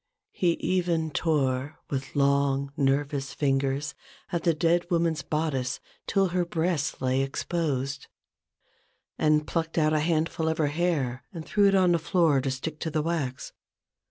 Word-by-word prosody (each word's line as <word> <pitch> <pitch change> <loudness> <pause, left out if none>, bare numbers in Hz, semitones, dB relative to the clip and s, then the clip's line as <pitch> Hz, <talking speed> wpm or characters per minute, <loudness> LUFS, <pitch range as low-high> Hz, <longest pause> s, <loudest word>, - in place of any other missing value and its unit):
He 175 -2 +2
even 170 -3 0
tore 140 -1 0
with 135 0 -4
long 140 -1 +2
nervous 140 0 0
fingers 135 0 0 0.4
at 170 -2 0
the 165 0 +3
dead 170 +2 +1
woman's 165 -3 +1
bodice 140 -3 -1 0.3
till 195 -2 +2
her 180 0 +1
breasts 170 -3 -1
lay 130 +1 +2
exposed; 135 -1 -2 1.1
and 150 -1 +3
plucked 165 +4 -2
out 155 -1 +3
a 155 - +3
handful 160 0 0
of 160 - -1
her 150 -2 +2
hair 145 -7 0
and 165 -5 -7
threw 205 -1 +3
it 195 - +4
on 185 -2 +4
the 170 - +3
floor 160 -4 +2
to 135 - -1
stick 145 +4 -4
to 160 - -2
the 155 -1 -1
wax. 145 -6 -3
155 Hz, 155 wpm, -27 LUFS, 140-170 Hz, 1.1 s, it